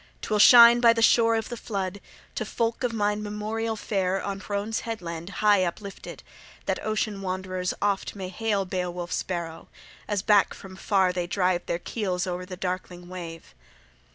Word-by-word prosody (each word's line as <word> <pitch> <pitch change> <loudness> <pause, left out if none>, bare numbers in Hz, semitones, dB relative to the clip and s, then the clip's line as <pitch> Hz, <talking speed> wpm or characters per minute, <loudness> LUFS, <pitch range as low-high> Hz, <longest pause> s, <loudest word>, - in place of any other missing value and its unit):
'Twill 210 -1 0
shine 235 +2 +9
by 235 -1 +6
the 230 - -2
shore 230 0 +5
of 225 -1 -2
the 240 - -4
flood, 200 -4 -4 0.3
to - - -2
folk 230 +3 -2
of 245 - +1
mine 210 -1 0
memorial 215 +2 -3
fair 195 -3 -1
on 195 0 -4
Hrones 205 +2 -3
Headland 175 -6 -6 0.2
high 205 -3 +5
uplifted, 195 +3 -6 0.4
that - - -2
ocean 215 -2 -2
wanderers 185 -1 -3
oft 200 0 -1
may 190 -2 -5
hail 200 0 -1
Beowulf's 180 -1 -3
Barrow, 170 -3 -5 0.4
as 205 -2 -1
back 205 -2 +4
from 190 -1 -11
far 190 -1 +1
they 175 -1 -2
drive 180 -1 0
their 170 - 0
keels 185 -1 -2
o'er 180 0 -4
the 185 -1 -7
darkling 180 -1 -5
wave." 170 -3 -8
195 Hz, 165 wpm, -26 LUFS, 180-215 Hz, 0.4 s, shine